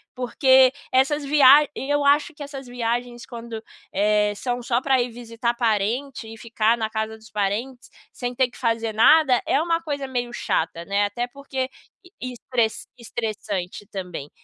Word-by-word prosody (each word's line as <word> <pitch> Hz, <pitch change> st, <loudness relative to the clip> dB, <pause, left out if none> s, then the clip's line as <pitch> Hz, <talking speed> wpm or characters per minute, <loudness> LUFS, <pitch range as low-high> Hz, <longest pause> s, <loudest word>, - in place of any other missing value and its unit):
porque 260 Hz, +1 st, +4 dB, 0.2 s
essas 270 Hz, +3 st, +2 dB
viag 285 Hz, 0 st, +6 dB
eu 290 Hz, +1 st, -1 dB
acho 290 Hz, +3 st, +3 dB
que 290 Hz, -1 st, -8 dB
essas 275 Hz, -2 st, -8 dB
viagens 240 Hz, 0 st, -3 dB
quando, 230 Hz, -2 st, -8 dB, 0.3 s
eh, 210 Hz, +1 st, +2 dB
são 245 Hz, +2 st, -3 dB
só 240 Hz, +1 st, 0 dB
pra 265 Hz, -2 st, +3 dB
ir 240 Hz, -, -2 dB
visitar 235 Hz, 0 st, -3 dB
parente 235 Hz, +3 st, -1 dB
e 225 Hz, 0 st, -10 dB
ficar 230 Hz, 0 st, +1 dB
na 220 Hz, -2 st, -2 dB
casa 220 Hz, 0 st, -3 dB
dos 220 Hz, 0 st, -17 dB
parentes 205 Hz, 0 st, 0 dB, 0.5 s
sem 245 Hz, 0 st, -4 dB
ter 260 Hz, -1 st, +2 dB
que -, -, -16 dB
fazer 230 Hz, -2 st, -1 dB
nada, 260 Hz, +2 st, +5 dB
é 285 Hz, -, +3 dB
uma 330 Hz, 0 st, 0 dB
coisa 285 Hz, -4 st, -4 dB
meio 245 Hz, -2 st, -3 dB
chata, 165 Hz, -6 st, -1 dB
né? 200 Hz, +2 st, +1 dB
Até 240 Hz, +4 st, -2 dB
porque, 265 Hz, 0 st, -4 dB, 0.5 s
estre 250 Hz, -2 st, -1 dB, 0.3 s
estressante 215 Hz, -5 st, -4 dB
também, 180 Hz, -7 st, -6 dB
240 Hz, 160 wpm, -23 LUFS, 220-265 Hz, 0.5 s, viag